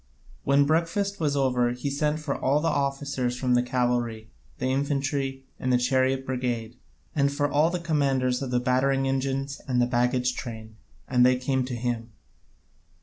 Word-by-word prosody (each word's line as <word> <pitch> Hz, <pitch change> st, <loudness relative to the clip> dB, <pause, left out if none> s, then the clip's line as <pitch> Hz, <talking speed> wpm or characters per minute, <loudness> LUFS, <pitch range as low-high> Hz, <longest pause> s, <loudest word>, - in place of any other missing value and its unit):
When 140 Hz, +1 st, +4 dB
breakfast 170 Hz, +6 st, 0 dB
was 150 Hz, -3 st, 0 dB
over 125 Hz, -3 st, +2 dB
he 125 Hz, +3 st, -3 dB
sent 150 Hz, +2 st, 0 dB
for 150 Hz, -2 st, -3 dB
all 140 Hz, +3 st, +1 dB
the 165 Hz, -, -1 dB
officers 140 Hz, -3 st, -1 dB
from 125 Hz, -1 st, +1 dB
the 120 Hz, -, +4 dB
cavalry, 120 Hz, -3 st, -1 dB, 0.3 s
the 130 Hz, -, -3 dB
infantry, 135 Hz, 0 st, -1 dB
and 130 Hz, -, -1 dB
the 125 Hz, -, +5 dB
chariot 130 Hz, +1 st, +1 dB
brigade, 125 Hz, -3 st, -2 dB, 0.4 s
and 140 Hz, -2 st, +2 dB
for 145 Hz, 0 st, 0 dB, 0.2 s
the 180 Hz, 0 st, -2 dB
commanders 135 Hz, -6 st, +1 dB
of 135 Hz, -, -3 dB
the 125 Hz, 0 st, +1 dB
battering 135 Hz, +2 st, +1 dB
engines 135 Hz, +1 st, -2 dB
and 125 Hz, -2 st, +1 dB
the 120 Hz, -, +4 dB
baggage 125 Hz, +1 st, +1 dB
train, 110 Hz, -3 st, -7 dB, 0.3 s
and 125 Hz, -1 st, +3 dB
they 125 Hz, +1 st, +5 dB
came 130 Hz, 0 st, 0 dB
to 125 Hz, -1 st, -4 dB
him. 120 Hz, -1 st, -3 dB
130 Hz, 165 wpm, -26 LUFS, 125-140 Hz, 0.4 s, the